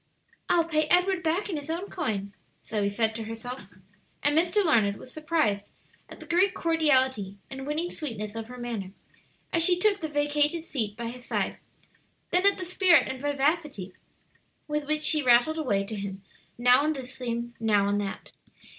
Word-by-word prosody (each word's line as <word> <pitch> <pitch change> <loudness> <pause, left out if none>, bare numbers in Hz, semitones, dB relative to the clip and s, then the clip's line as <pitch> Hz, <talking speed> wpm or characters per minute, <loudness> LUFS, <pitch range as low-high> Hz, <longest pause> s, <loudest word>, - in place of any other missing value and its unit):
"I'll 340 - +4
pay 310 -2 +1
Edward 360 +2 +3
back 340 +6 0
in 355 -6 -3
his 290 +1 -7
own 345 +5 -3
coin," 205 - -3 0.3
Zoe 210 -2 -1
said 220 +2 +1
to 225 0 -5
herself, 225 +1 -7 0.6
and 290 +1 +3
Mr. 355 +5 +3
Larned 215 -10 +3
was 255 - -11
surprised 305 -11 0 0.4
at - - -11
the - - -9
great 370 +3 +2
cordiality 260 - +1
and 270 0 -6
winning 320 +4 -2
sweetness 215 -9 -5
of 225 -1 -6
her 250 +1 -10
manner 225 -6 -5 0.6
as 330 - +4
she 355 +1 +4
took 400 +1 +2
the 315 - -3
vacated 295 +2 +1
seat 220 -9 -3
by 235 0 -4
his 245 +1 -9
side, - - -1 0.7
then 365 +3 +4
at 400 - +4
the 370 - -5
spirit 355 -5 +4
and 260 -1 -5
vivacity 290 - -1 0.7
with 300 -1 -2
which 305 0 0
she 305 -1 +5
rattled 255 +5 +4
away 205 -10 +1
to 215 +2 -6
him, 195 -1 -6 0.3
now 245 +2 +5
on 305 +2 +1
this 260 -2 -8
theme, 235 -2 -4
now 210 -3 +3
on 205 0 +1
that. 200 -1 -5
275 Hz, 180 wpm, -27 LUFS, 225-325 Hz, 0.7 s, she